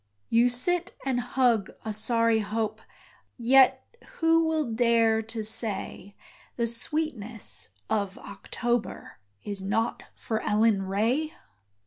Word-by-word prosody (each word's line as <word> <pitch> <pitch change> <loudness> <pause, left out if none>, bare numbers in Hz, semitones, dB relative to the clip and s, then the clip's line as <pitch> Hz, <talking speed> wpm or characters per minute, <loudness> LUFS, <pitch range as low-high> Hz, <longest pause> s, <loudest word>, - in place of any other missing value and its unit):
You 235 +2 +4
sit 355 +9 0
and 260 -2 0
hug 245 -4 +1 0.2
a 220 - -2
sorry 230 +1 +2
hope 215 +1 -2 0.6
Yet 260 +2 +5 0.3
who 325 0 +3
will 315 -1 0
dare 230 -1 +3
to 225 0 -6
say, 205 -2 -2 0.4
The 235 - 0
sweetness 235 - -2 0.2
of 200 -2 -1
October 240 - -4 0.2
Is 200 -2 -4
not 220 +4 -1
for 220 -1 -3
Ellen 210 -1 +2
Ray? 235 +11 0
230 Hz, 110 wpm, -27 LUFS, 215-250 Hz, 0.6 s, Yet